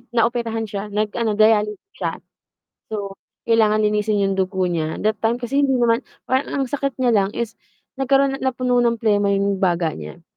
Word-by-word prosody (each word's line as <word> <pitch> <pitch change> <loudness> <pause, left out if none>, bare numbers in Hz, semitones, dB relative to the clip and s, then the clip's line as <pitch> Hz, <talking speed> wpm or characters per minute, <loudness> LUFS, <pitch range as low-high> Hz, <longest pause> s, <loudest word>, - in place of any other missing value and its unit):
naoperahan 230 -1 +1
siya, 200 +1 -4
nag-ano 215 +2 -1
dialysis 210 -1 +3 0.2
siya. - - -2 0.8
So, 200 -2 -4 0.3
kailangan 215 -2 +3
linisin 210 0 +1
'yong 195 0 +1
dugo 190 0 0
niya. 160 -3 -2
That 215 -1 +1
time 230 +1 +2
kasi 250 +3 0
hindi 270 -2 +2
naman 235 0 +3 0.3
parang 260 +2 0
ang 275 - +1
sakit 275 0 -3
niya 250 -2 +2
lang 195 -1 +2
is 235 -1 -3 0.5
nagkaroon 270 0 +2
napuno 250 -1 +1
ng 235 -1 +2
plema 205 -3 +2
'yong 200 0 +1
baga 170 -3 +1
niya. 75 -1 -9
215 Hz, 170 wpm, -21 LUFS, 200-240 Hz, 0.8 s, dialysis